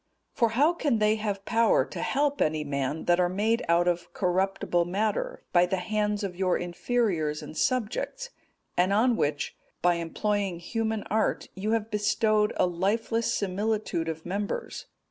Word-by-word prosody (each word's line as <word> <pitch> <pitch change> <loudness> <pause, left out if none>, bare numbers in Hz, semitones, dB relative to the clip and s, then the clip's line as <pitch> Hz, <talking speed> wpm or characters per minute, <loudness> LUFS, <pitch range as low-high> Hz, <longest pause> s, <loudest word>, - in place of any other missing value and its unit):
'(222) - - -20
For 230 0 +2
how 310 +4 +5
can 290 -8 +1
they 215 0 +3
have 205 -2 -3
power 230 0 +3
to - - -7
help 285 +1 0
any 155 0 +1
man, 140 +1 -2
that 175 0 +3
are 175 -1 +3
made 215 +5 +1
out 170 +1 +4
of 175 0 -1
corruptible 185 -1 +1
matter, 200 +4 -2
by 175 0 +5
the 190 - 0
hands 210 +2 -1
of 190 -3 -3
your 185 0 +1
inferiors 175 -4 -1
and 155 - -9
subjects, 255 - -1 0.4
and 180 +2 +2
on 235 +4 +3
which, 145 -7 -1 0.3
by 175 0 +5
employing 195 +2 -1
human 220 +4 -2
art, 220 +2 -1
you 210 +4 -2
have 225 -1 -1
bestowed 210 0 +2
a - - +4
lifeless 220 +6 0
similitude 200 -4 -1
of 160 0 -6
members? 200 +3 -4
205 Hz, 165 wpm, -27 LUFS, 175-220 Hz, 0.4 s, how